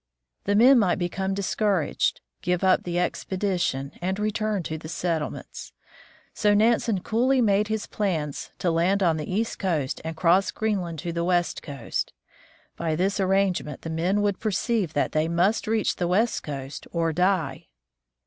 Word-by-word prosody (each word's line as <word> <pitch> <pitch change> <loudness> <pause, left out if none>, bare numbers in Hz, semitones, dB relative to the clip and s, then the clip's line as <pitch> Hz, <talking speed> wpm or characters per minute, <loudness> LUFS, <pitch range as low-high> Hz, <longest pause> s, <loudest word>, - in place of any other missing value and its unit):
The 205 - +2
men 250 +4 +7
might 185 -5 +2
become 190 +2 -2
discouraged, 200 -3 0 0.2
give 180 0 0
up 185 -1 +4
the 175 0 -2
expedition, 180 -6 -1
and 190 +2 -1
return 215 -2 -1
to 160 - -4
the 155 - -9
settlements. 165 -3 -4 0.6
So 210 -2 +3
Nansen 225 -2 +2
coolly 255 +6 +2
made 210 -3 +3
his 220 -1 -2
plans 160 -9 -2
to 175 - 0
land 185 +4 +2
on 165 -3 +3
the 150 +3 -5
east 225 +4 -1
coast 155 -7 -1
and 160 0 -5
cross 180 +3 +3
Greenland 190 -7 -2
to 170 +1 -4
the 170 0 -1
west 175 -1 +1
coast. 140 -6 -4 0.6
By 160 -2 -1
this 195 +5 0
arrangement 190 -6 0
the 165 - -4
men 180 +6 +1
would 205 -2 0
perceive 215 -4 0
that 145 - 0
they 155 +1 +1
must 180 +7 +1
reach 220 -1 +1
the 175 - 0
west 215 +6 +1
coast 140 -1 -7
or 165 -1 0
die. 180 -6 0
185 Hz, 160 wpm, -25 LUFS, 165-205 Hz, 0.6 s, men